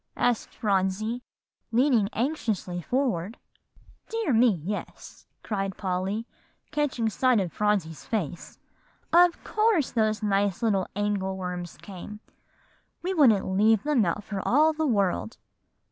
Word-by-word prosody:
asked 245 -2 +1
Phronsie, 205 +3 0 0.5
leaning 235 -4 +3
anxiously 220 - -2
forward. 230 - -1 0.7
"Dear 450 - 0
me, 225 -5 +4
yes," 205 +4 -7 0.2
cried 195 -3 -3
Polly, 190 +3 -2 0.5
catching 295 -7 0
sight 245 +2 +2
of 180 -4 -2
Phronsie's 200 -7 0
face; 185 - -4 0.6
"of 350 0 +5
course 425 - +2
those 215 -1 0
nice 200 0 +1 0.3
angle 200 -2 -1
worms 180 -2 -5
came. 205 +2 -9 0.8
We 370 +2 -1
wouldn't 250 - +5
leave 210 +3 +3
them 290 -6 +2
out 195 +3 -1
for 200 -2 -4
all 310 +5 +4
the 315 0 -1
world. 195 - 0
210 Hz, 115 wpm, -26 LUFS, 190-250 Hz, 0.8 s, of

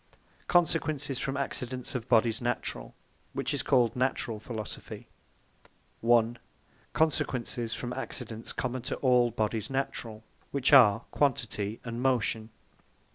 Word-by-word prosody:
Consequences 155 -5 +1
from 135 +1 -2
Accidents 130 -2 -2
of 120 -3 -4
Bodies 115 -1 +3
Naturall; 120 - -3 0.4
which - - -1
is - - 0
called 120 -3 +3
NATURALL 125 -3 -1
PHILOSOPHY 110 -2 -6 0.9
1. 120 0 +3 0.5
Consequences 125 -6 0
from 120 - -5
the 130 - -4
Accidents 115 -4 -5
common 130 0 -3
to 125 - -3
all 125 -2 +4
Bodies 110 +1 -1
Naturall; 120 -5 -3 0.3
which 140 +1 +1
are 115 -5 +8
Quantity, 115 -6 0
and 115 0 -5
Motion. 115 -4 +1
120 Hz, 120 wpm, -29 LUFS, 115-135 Hz, 0.9 s, are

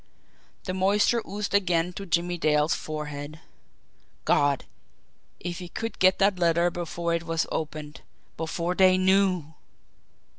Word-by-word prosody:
The 185 - -3
moisture 205 +5 +2
oozed 205 +1 -4
again 180 -3 +2
to 195 +2 -7
Jimmie 175 +1 0
Dale's 150 0 +2
forehead. 150 0 -6 0.9
God, 145 -2 +2 0.7
if 175 0 -5
he 180 -1 -8
could 225 +4 -5
get 185 0 +5
that 195 -2 +2
letter 170 0 +3
before 170 0 -3
it 170 - 0
was 165 -1 0
opened 155 -1 -5 0.3
before 170 +2 -2
they 185 0 +5
KNEW! 185 -4 +2
175 Hz, 125 wpm, -26 LUFS, 160-185 Hz, 0.9 s, get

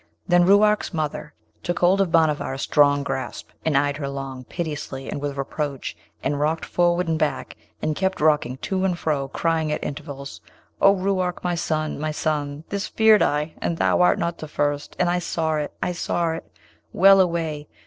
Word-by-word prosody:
Then 175 -1 +5
Ruark's 205 0 +4
mother 150 -1 -3 0.3
took 175 - -2
hold 185 +3 +4
of 185 -4 0
Bhanavar 155 -4 +2
a - - -6
strong 145 0 +3
grasp, 135 -1 -4
and 155 -3 +2
eyed 145 0 +1
her 140 -2 -4
long, 135 -2 -6
piteously, 150 -5 -5
and 145 - -4
with 145 -1 -3
reproach, 140 0 -3 0.3
and 145 +1 -1
rocked 155 +2 0
forward 175 0 +1
and 160 -1 0
back, 155 - -2 0.3
and 155 -1 0
kept 190 +3 -1
rocking 150 -5 +2
to 190 +7 -2
and 185 -2 +1
fro, 145 -5 -1
crying 160 +2 0
at - - -2
intervals, 140 -2 -7 0.4
'O 195 0 +6
Ruark! 185 -2 -1
my 180 - 0
son! 155 -3 -2
my 155 +1 -2
son! 150 -1 -2
this 200 0 -2
feared 220 -3 +5
I, 150 +1 +1
and 170 - -1
thou - - +2
art 180 - +4
not 170 0 -2
the 155 - -6
first! 145 -1 -2
and 180 - +2
I 175 +1 +1
saw 160 -2 -1
it, 150 -1 -3
I 180 - 0
saw 170 -1 -1
it! 165 - -7 0.4
Well 195 +1 +6
away! 165 -4 -1
155 Hz, 190 wpm, -23 LUFS, 145-175 Hz, 0.4 s, O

